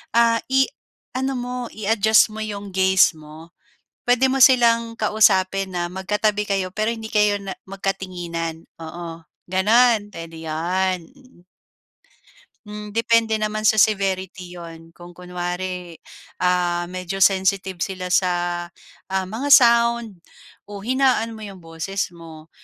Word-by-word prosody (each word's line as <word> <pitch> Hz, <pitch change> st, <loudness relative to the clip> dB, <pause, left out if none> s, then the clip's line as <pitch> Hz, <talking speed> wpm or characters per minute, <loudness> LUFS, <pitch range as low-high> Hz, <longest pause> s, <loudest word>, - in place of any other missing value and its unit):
ah 230 Hz, 0 st, +4 dB
i-ano 265 Hz, 0 st, -2 dB
mo, 245 Hz, +1 st, -5 dB, 0.2 s
i-adjust 215 Hz, +1 st, +3 dB
mo 215 Hz, -, -7 dB
'yong 205 Hz, -2 st, -6 dB
gaze 190 Hz, 0 st, +4 dB
mo. 155 Hz, +2 st, -13 dB, 0.6 s
Puwede 250 Hz, +2 st, +4 dB
mo 270 Hz, -, 0 dB
silang 230 Hz, -3 st, +3 dB
kausapin 195 Hz, -3 st, +2 dB
na 175 Hz, 0 st, -1 dB
magkatabi 210 Hz, +2 st, -1 dB
kayo, 195 Hz, -2 st, -1 dB
pero 215 Hz, +1 st, 0 dB
hindi 220 Hz, -1 st, -7 dB
kayo 210 Hz, -1 st, +3 dB
na 195 Hz, -, -5 dB, 0.2 s
magkatinginan. 175 Hz, -4 st, -4 dB, 0.2 s
Oo 165 Hz, 0 st, -8 dB, 0.3 s
gano'n, 215 Hz, +3 st, +3 dB
puwede 165 Hz, -1 st, -9 dB
'yon. 180 Hz, +4 st, 0 dB, 0.2 s
Mm. 255 Hz, -10 st, -22 dB, 1.2 s
Hmm, 210 Hz, 0 st, -8 dB
depende 230 Hz, 0 st, +2 dB
naman 215 Hz, 0 st, -2 dB
sa 215 Hz, 0 st, +3 dB
severity 190 Hz, -4 st, 0 dB
'yon. 165 Hz, -1 st, -11 dB
Kung 175 Hz, +1 st, -14 dB
kunwari, 180 Hz, 0 st, -5 dB, 0.4 s
ah, 175 Hz, -1 st, +1 dB
medyo 185 Hz, +1 st, -5 dB
sensitive 190 Hz, -1 st, +2 dB
sila 185 Hz, +1 st, -4 dB
sa 180 Hz, 0 st, +2 dB, 0.7 s
ah, 190 Hz, 0 st, -2 dB
mga 270 Hz, +7 st, +2 dB
sound, 235 Hz, -4 st, +4 dB, 0.5 s
o 205 Hz, -1 st, -9 dB
hinaan 250 Hz, -1 st, +1 dB
mo 215 Hz, -, -8 dB
'yong 195 Hz, -3 st, -11 dB
boses 165 Hz, +4 st, -4 dB
mo. 165 Hz, -2 st, -13 dB
195 Hz, 125 wpm, -22 LUFS, 180-220 Hz, 1.2 s, ah